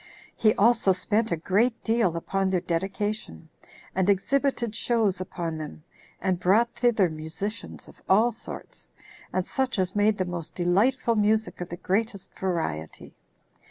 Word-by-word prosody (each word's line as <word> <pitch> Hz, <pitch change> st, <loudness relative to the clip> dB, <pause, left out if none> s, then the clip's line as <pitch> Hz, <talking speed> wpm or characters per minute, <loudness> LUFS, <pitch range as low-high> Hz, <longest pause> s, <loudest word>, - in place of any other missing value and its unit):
He 215 Hz, -1 st, +3 dB
also 220 Hz, -2 st, +4 dB
spent 215 Hz, +4 st, 0 dB
a 170 Hz, -, +1 dB
great 220 Hz, +8 st, +1 dB
deal 225 Hz, -7 st, +2 dB
upon 195 Hz, +3 st, -1 dB
their 185 Hz, -1 st, +1 dB
dedication, 195 Hz, -, -3 dB, 0.4 s
and 190 Hz, +1 st, +1 dB
exhibited 235 Hz, +2 st, +1 dB
shows 220 Hz, -7 st, +1 dB
upon 170 Hz, -3 st, -4 dB
them, 80 Hz, -, -8 dB, 0.4 s
and 185 Hz, -2 st, 0 dB
brought 220 Hz, +6 st, +3 dB
thither 230 Hz, -6 st, +3 dB
musicians 160 Hz, +7 st, -6 dB
of -, -, -17 dB
all 220 Hz, +5 st, +5 dB
sorts, 230 Hz, -, -9 dB, 0.4 s
and 185 Hz, -1 st, -1 dB
such 265 Hz, -3 st, -1 dB
as 185 Hz, 0 st, 0 dB
made 205 Hz, +1 st, +3 dB
the 185 Hz, -, 0 dB
most 170 Hz, -2 st, -6 dB
delightful 215 Hz, +8 st, +2 dB
music 215 Hz, -1 st, +1 dB
of 175 Hz, -, -5 dB
the 175 Hz, -, -6 dB
greatest 200 Hz, +2 st, -2 dB
variety. 160 Hz, -, -3 dB
195 Hz, 145 wpm, -26 LUFS, 175-225 Hz, 0.4 s, all